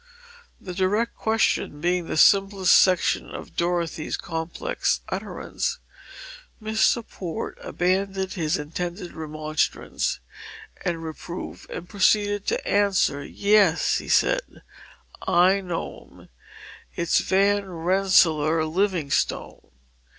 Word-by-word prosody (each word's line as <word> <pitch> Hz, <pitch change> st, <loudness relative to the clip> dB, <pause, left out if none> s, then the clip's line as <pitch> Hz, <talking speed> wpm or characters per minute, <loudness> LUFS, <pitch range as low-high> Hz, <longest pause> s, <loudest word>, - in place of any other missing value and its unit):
The 180 Hz, -, -7 dB
direct 200 Hz, +5 st, 0 dB
question 220 Hz, -8 st, 0 dB
being 175 Hz, +1 st, 0 dB
the -, -, -3 dB
simplest 195 Hz, 0 st, +5 dB
section 185 Hz, -2 st, +3 dB
of -, -, -9 dB
Dorothy's 170 Hz, -2 st, -1 dB
complex 165 Hz, -, -2 dB
utterance, 485 Hz, -1 st, -3 dB, 0.8 s
Mr. 220 Hz, +1 st, +1 dB
Port 170 Hz, -4 st, -5 dB
abandoned 190 Hz, +1 st, -1 dB
his 165 Hz, -4 st, 0 dB
intended 175 Hz, +4 st, -5 dB
remonstrance 155 Hz, -, -2 dB, 0.6 s
and 170 Hz, -3 st, -2 dB
reproof 165 Hz, +2 st, -7 dB
and 175 Hz, -, -7 dB
proceeded 205 Hz, +1 st, +2 dB
to -, -, -1 dB
answer 200 Hz, -8 st, +2 dB
it. -, -, -9 dB
"Yes," 200 Hz, -5 st, +3 dB
he -, -, -9 dB
said, -, -, +1 dB, 0.6 s
"I 185 Hz, +3 st, +4 dB
know 175 Hz, -2 st, -5 dB
him. -, -, -18 dB, 0.7 s
It's 170 Hz, -1 st, +2 dB
Van 200 Hz, +1 st, +2 dB
Rensselaer 165 Hz, -3 st, +3 dB
Livingstone. 170 Hz, -3 st, -1 dB
180 Hz, 100 wpm, -24 LUFS, 165-200 Hz, 0.8 s, simplest